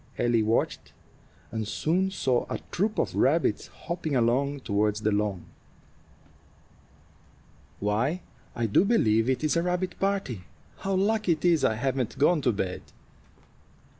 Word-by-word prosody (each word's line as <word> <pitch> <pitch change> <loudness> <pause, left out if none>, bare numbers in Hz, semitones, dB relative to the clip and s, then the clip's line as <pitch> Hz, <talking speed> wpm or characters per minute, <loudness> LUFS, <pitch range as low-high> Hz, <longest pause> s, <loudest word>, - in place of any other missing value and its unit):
Ellie 120 -2 +2
watched, 110 +1 -1 0.6
and 110 -2 -3
soon 180 - 0
saw 130 -10 0
a - - -2
troop 210 +4 0
of - - 0
rabbits - - +2
hopping 170 -4 -4
along 135 +4 +1
toward 105 -1 +1
the 110 0 0
lawn. 100 -3 -1 2.3
"Why, 115 - 0 0.3
I 120 - -1
do 110 - +4
believe 115 - +3
it 130 +2 0
is 155 - +1
a 170 - +3
rabbit 180 +1 -2
party. 195 - -1 0.4
How 195 0 -2
lucky 205 -1 +2
it 155 +2 -5
is 170 -4 +4
I 110 - +3
haven't 130 +1 -2
gone 150 +3 +3
to 125 - +2
bed!" 95 -3 -3
135 Hz, 135 wpm, -27 LUFS, 110-180 Hz, 2.3 s, do